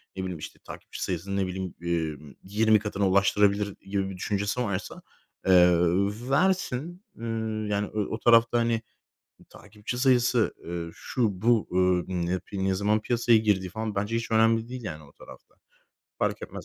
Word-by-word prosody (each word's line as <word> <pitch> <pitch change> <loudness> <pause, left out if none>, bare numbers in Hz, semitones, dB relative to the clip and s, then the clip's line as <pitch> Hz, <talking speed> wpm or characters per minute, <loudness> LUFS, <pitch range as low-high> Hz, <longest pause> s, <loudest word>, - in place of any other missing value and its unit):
ne 95 - -4
bileyim, 90 -3 -4
işte, - - -9
takipçi - - -8
sayısını, 95 +2 -3
ne 95 -1 0
bileyim, 95 -1 -5
emm, 80 -5 -3
20 110 +2 +3
katına 100 -1 -1
ulaştırabilir." 100 +1 +2
gibi 95 0 -2
bir 95 - -7
düşüncesi 100 +5 -1
varsa, 100 -4 -4 0.5
eee, 95 - +5
ööö 90 +6 +3
versin. 175 +1 0
Iıı, 110 -2 -3
yani, 105 0 -1
ö 105 -2 0
o 110 - -5
tarafta, 115 0 +5
hani, 115 -1 +1 0.7
takipçi 105 +3 -8
sayısı, 125 -2 +3
eee, 85 0 -4
şu, 105 -8 -2
bu, 115 -1 +3
ööö, 90 - +1 0.4
ımm, 85 -1 -1
ne 85 - -2
yapi 95 +1 -3
ne 95 - +2
zaman 105 +2 +1
piyasaya 120 0 +3
girdiği 100 -4 +1
falan 110 0 -4
bence 105 +3 -1
hiç 115 0 -3
önemli 115 +1 +3
değil, 125 -2 -7
yani, 80 -6 -6
o 70 - -17
tarafta. - - -15 0.6
Fark - - -1
etmez - - -8
105 Hz, 170 wpm, -27 LUFS, 95-115 Hz, 0.7 s, eee